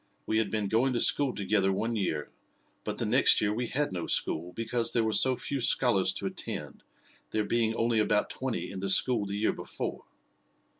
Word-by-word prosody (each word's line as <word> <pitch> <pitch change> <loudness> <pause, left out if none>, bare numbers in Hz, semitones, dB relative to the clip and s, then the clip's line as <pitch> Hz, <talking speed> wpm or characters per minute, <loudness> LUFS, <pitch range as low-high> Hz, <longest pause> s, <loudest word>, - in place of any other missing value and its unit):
We 110 - 0
had 110 -3 -1
been 105 -1 -2
going 120 +6 +1
to 120 - 0
school 140 +2 +3
together 100 -2 0
one 115 +4 -2
year; 80 -8 -3 0.5
but - - -4
the - - -2
next - - +4
year 105 0 0
we 120 +2 -3
had 145 0 -1
no 90 -2 -4
school, 85 +3 -1
because 115 +3 -2
there 115 - +2
were 110 - 0
so 130 +4 +4
few 140 +1 -4
scholars - - +3
to - - -4
attend, - - -5 0.5
there 110 - -1
being 115 0 0
only 115 -1 +1
about 105 -1 +1
twenty 130 -2 -4
in 95 - -6
the 100 +1 -3
school 110 +1 +4
the 100 +1 -4
year 110 - +1
before. - - -6
110 Hz, 200 wpm, -28 LUFS, 100-120 Hz, 0.5 s, next